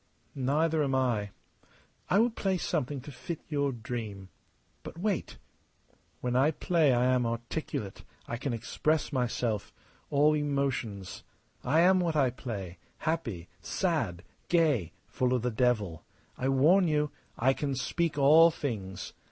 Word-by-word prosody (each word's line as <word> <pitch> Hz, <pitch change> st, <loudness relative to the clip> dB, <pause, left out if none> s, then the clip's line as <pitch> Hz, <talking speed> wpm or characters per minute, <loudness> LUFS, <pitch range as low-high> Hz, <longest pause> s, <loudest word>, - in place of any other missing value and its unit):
"Neither 150 Hz, +4 st, +1 dB
am 135 Hz, -2 st, 0 dB
I. 120 Hz, -6 st, +1 dB, 0.8 s
I 190 Hz, -, +4 dB
will 230 Hz, +3 st, +4 dB
play 195 Hz, -4 st, -1 dB
something 145 Hz, -5 st, -2 dB
to 145 Hz, -, -9 dB
fit 140 Hz, +6 st, -6 dB
your 140 Hz, -2 st, +1 dB
dream. 110 Hz, -5 st, -6 dB, 0.5 s
But -, -, -9 dB
wait! 195 Hz, +1 st, -2 dB, 0.8 s
When 125 Hz, 0 st, -1 dB
I 135 Hz, +4 st, +5 dB
play 160 Hz, -1 st, +2 dB
I 125 Hz, 0 st, +3 dB
am 125 Hz, -2 st, +2 dB
articulate. 115 Hz, -3 st, -4 dB, 0.2 s
I 120 Hz, -, -3 dB
can 135 Hz, +3 st, -3 dB
express 150 Hz, +7 st, -1 dB
myself 120 Hz, -4 st, -1 dB, 0.4 s
all 150 Hz, +1 st, +4 dB
emotions. 130 Hz, -, -2 dB, 0.4 s
I 155 Hz, +6 st, +3 dB
am 185 Hz, +1 st, +5 dB
what 170 Hz, -3 st, 0 dB
I 135 Hz, -4 st, +3 dB
play 100 Hz, -8 st, -6 dB, 0.2 s
happy, 120 Hz, -, -3 dB
sad, 115 Hz, -, -1 dB, 0.3 s
gay, 150 Hz, -, +2 dB
full 130 Hz, 0 st, 0 dB
of 120 Hz, -, -1 dB
the 125 Hz, -, 0 dB
devil. 110 Hz, -8 st, 0 dB, 0.3 s
I 130 Hz, -, -1 dB
warn 165 Hz, +8 st, +5 dB
you. 150 Hz, -1 st, +1 dB, 0.3 s
I 130 Hz, +3 st, +3 dB
can 140 Hz, -1 st, -2 dB
speak 165 Hz, +4 st, -1 dB
all 155 Hz, +4 st, +7 dB
things. 105 Hz, -, -5 dB
135 Hz, 140 wpm, -30 LUFS, 115-155 Hz, 0.8 s, all